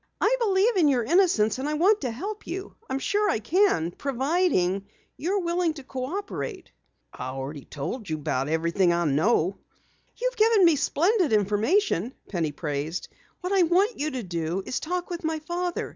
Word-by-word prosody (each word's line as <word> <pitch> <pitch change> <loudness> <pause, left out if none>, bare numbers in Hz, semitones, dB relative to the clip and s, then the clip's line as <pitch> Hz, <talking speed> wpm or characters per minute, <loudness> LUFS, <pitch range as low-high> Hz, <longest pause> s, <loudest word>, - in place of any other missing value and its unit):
"I - - +3
believe 415 0 +2
in 330 -5 +5
your 255 -4 +2
innocence, 260 - +3
and 280 +3 -2
I 305 - -1
want 395 +7 +3
to 260 - -1
help 395 - -6
you. 380 +3 -5 0.2
I - - -2
am - - +1
sure 415 +8 +1
I - - +2
can, 220 - +2
providing 265 - 0 0.3
you 350 +6 -2
are - - +2
willing 345 -2 0
to 280 - -9
cooperate." 370 - -5 0.4
"I've 130 +1 -6
already 135 +1 -6
told 180 - -5
you 155 - 0
about 140 -2 -2
everything 170 +3 +2
I 170 0 +1
know." 165 +5 +2 0.6
"You've - - -1
given 435 -3 +5
me 335 -2 +6
splendid 340 - +2
information," 215 - +1
Penny 165 -6 -1
praised. 150 +3 -4 0.3
"What 365 +2 -2
I 390 - +4
want 370 +7 +2
you 300 +2 0
to 260 -5 -4
do 170 +1 -3
is - - -2
to 315 - -8
talk 360 0 -2
with 345 -1 -4
my 320 0 -1
father. 345 +3 -3
285 Hz, 185 wpm, -26 LUFS, -, 0.6 s, me